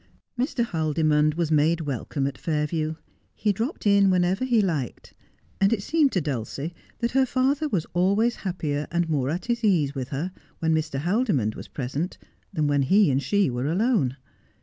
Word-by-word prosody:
Mr. 250 -1 0
Haldimond 155 -3 +1
was 165 -2 -1
made 160 +2 +3
welcome 140 -1 -3
at 140 - -2
Fairview. 155 0 -1 0.4
He 210 -2 +1
dropped 230 - -4
in 200 -1 +5
whenever 185 +4 +2
he 245 -3 +3
liked; 160 - -2 0.5
and 195 0 +4
it 210 -4 0
seemed 310 -1 +2
to 185 - +1
Dulcie 145 +3 -4 0.2
that 235 0 -1
her 265 0 +3
father 270 +5 +1
was 180 - 0
always 200 +7 +2
happier 150 -6 -3
and 170 0 0
more 140 -5 0
at 170 +4 -3
his 235 0 -1
ease 165 -10 +2
with 130 -3 -4
her 150 +6 -3 0.3
when 160 0 +1
Mr. 155 -3 -1
Haldimond 175 - +1
was - - -9
present 145 +7 -4 0.3
than 155 -6 0
when 145 -1 +2
he 190 +5 +4
and 135 +1 +1
she 195 +8 +2
were 125 +3 -2
alone. 170 - +1
165 Hz, 175 wpm, -25 LUFS, 145-205 Hz, 0.5 s, in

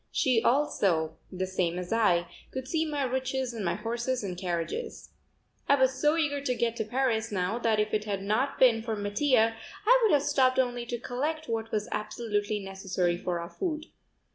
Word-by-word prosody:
She 250 -4 +2
also, 185 - +2
the 185 0 -2
same 180 -2 -1
as 180 +3 -3
I, 180 -7 +3 0.2
could 260 0 -6
see 320 +3 0
my 295 -2 -1
riches 260 0 -1
and 225 -3 -4
my 170 - 0
horses 235 +3 -2
and 185 -3 -3
carriages. 180 - -4 0.6
I 280 - +7
was 265 -1 +3
so 300 +2 +4
eager 285 -3 0
to 255 -3 -1
get 235 -1 0
to 220 - 0
Paris 230 -1 0
now 190 +4 -1
that 225 -2 +2
if 210 0 0
it 210 0 0
had 200 -2 -3
not 235 +8 0
been 235 -3 +5
for 225 -1 -3
Mattia 220 +3 +2 0.3
I - - +6
would 445 - +4
have 280 - +2
stopped 265 -3 +3
only 245 -2 0
to 240 - -2
collect 295 +7 -3
what 225 -1 -3
was 210 -1 -1
absolutely 210 -1 -2
necessary 190 -2 -1
for 175 0 -3
our 170 0 -6
food. 320 -4 -4
230 Hz, 190 wpm, -29 LUFS, 200-265 Hz, 0.6 s, I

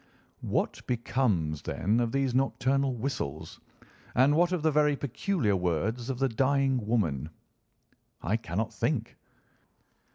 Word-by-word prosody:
"What - - -1
becomes, 110 - 0
then, 105 +5 0
of 120 -1 0
these 135 -2 0
nocturnal 135 0 +1
whistles, 110 - -4 0.6
and 130 +4 +5
what 175 +2 +3
of 180 -4 -1
the 160 - +3
very 150 0 +3
peculiar 140 - 0
words 95 - -1
of 130 - -2
the 135 +1 +2
dying 135 +1 +1
woman?" 80 - 0 0.9
"I 100 +7 +1
cannot 110 +1 -3
think." 120 -7 -1
125 Hz, 125 wpm, -29 LUFS, 105-135 Hz, 0.9 s, and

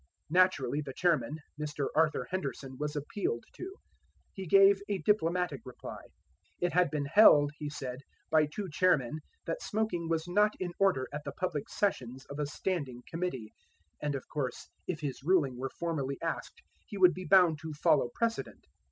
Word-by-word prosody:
Naturally 155 -6 +3
the 140 -3 -7
chairman, 155 -5 +1 0.2
Mr. 145 -2 -2
Arthur 155 -1 +2
Henderson, 140 -6 -4
was 150 +1 -3
appealed 145 - -2
to. 380 +2 -8 0.6
He 190 -2 -6
gave 195 +2 +6
a 200 - +1
diplomatic 180 -4 +1
reply. 125 - -9 0.6
It 175 -2 0
had 180 0 +4
been 150 -2 -2
held, 145 -3 +7
he 150 - -3
said, 130 -3 -5 0.3
by 155 -1 +4
two 195 +7 -5
chairmen 155 -5 +2 0.3
that - - -3
smoking 205 -6 -2
was 165 0 0
not 210 +4 +3
in 180 -2 -3
order 190 -10 +3
at 150 0 -4
the - - -5
public 170 -6 -3
sessions 130 - -2
of 140 - -6
a 150 - 0
Standing 145 -6 -3
Committee; 165 -11 -4 0.5
and, 145 -1 -1
of 135 - -6
course, 135 -5 -4 0.2
if 160 -4 -3
his 140 -2 -4
ruling 150 -5 +2
were 130 +2 -4
formally 140 -5 -3
asked 165 - -4 0.2
he 205 - -7
would 180 -2 +6
be 185 0 -7
bound 180 -5 +5
to 160 0 -6
follow 145 -3 +2
precedent. 230 -1 -2
155 Hz, 170 wpm, -31 LUFS, 140-185 Hz, 0.6 s, held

